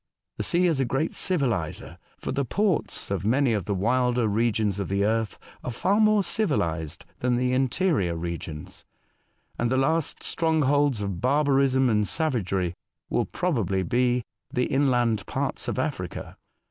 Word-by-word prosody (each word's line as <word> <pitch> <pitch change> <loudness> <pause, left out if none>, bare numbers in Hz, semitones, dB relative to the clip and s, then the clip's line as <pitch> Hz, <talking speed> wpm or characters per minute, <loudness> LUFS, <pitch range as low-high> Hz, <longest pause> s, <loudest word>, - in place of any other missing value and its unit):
The - - -2
sea 180 +1 +2
is 165 -6 +2
a 135 - +2
great 135 +6 -1
civiHser, 125 - -1 0.2
for - - -4
the 140 - 0
ports 190 - 0
of 95 -3 -1
many 125 +3 +2
of 100 -5 -1
the 100 - -1
wilder 125 +3 +1
resrions 105 -2 +1
of 100 - -3
the 100 +1 +1
earth 110 0 0 0.3
are - - -3
far 190 - +1
more 215 -2 +4
civilised 85 - -1
than 125 0 +1
the 125 +1 +1
interior 130 - +1
regions; 80 -2 -6 0.8
and 120 0 +1
the 130 - +2
last 150 +3 0
strongholds 145 -6 +2
of 100 -4 -3
barbarism 135 -1 +3
and 105 -3 +2
savagery 95 - 0 0.4
will - - +1
probably 105 - -1
be 125 +2 +1 0.3
the 125 0 +1
inland 120 -6 +2
parts - - -2
of - - -2
Africa. - - -4
125 Hz, 150 wpm, -26 LUFS, 100-145 Hz, 0.8 s, more